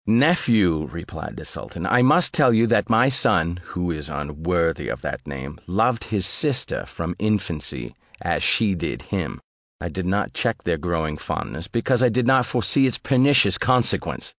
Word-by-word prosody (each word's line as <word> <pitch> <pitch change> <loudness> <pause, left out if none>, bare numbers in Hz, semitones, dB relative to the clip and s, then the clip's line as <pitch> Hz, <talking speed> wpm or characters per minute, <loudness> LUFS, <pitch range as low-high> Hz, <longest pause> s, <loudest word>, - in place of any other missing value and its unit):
"Nephew," 110 - +3
replied 85 +2 -8
the - - -8
sultan, - - -6
"I 125 - +3
must 170 +9 +4
tell 145 -7 +4
you, 115 +1 +4
that 120 +1 +1
my 115 +3 +4
son 90 -10 +2
(who 90 -1 -3
is 75 -2 -6
unworthy 80 +3 -2
of - - -4
that - - -6
name) 70 +2 -7
loved 110 +6 +1
his 105 -5 -1
sister 135 +6 0
from 85 +1 -5
his 105 - -1
infancy, 85 - -2 0.3
as - - -1
she 105 -4 +2
did 85 - -4
him: - - -4 0.4
I - - -5
did 95 -1 -4
not 100 +2 -1
check - - -1
their - - -1
growing 80 -3 -2
fondness, 80 +3 -5
because 120 +3 0
I 125 - +5
did 120 +2 0
not 130 -1 +4
foresee 125 +4 +2
its 125 - -1
pernicious 130 -7 +3
consequence. 125 -2 0
105 Hz, 175 wpm, -22 LUFS, 85-125 Hz, 0.4 s, I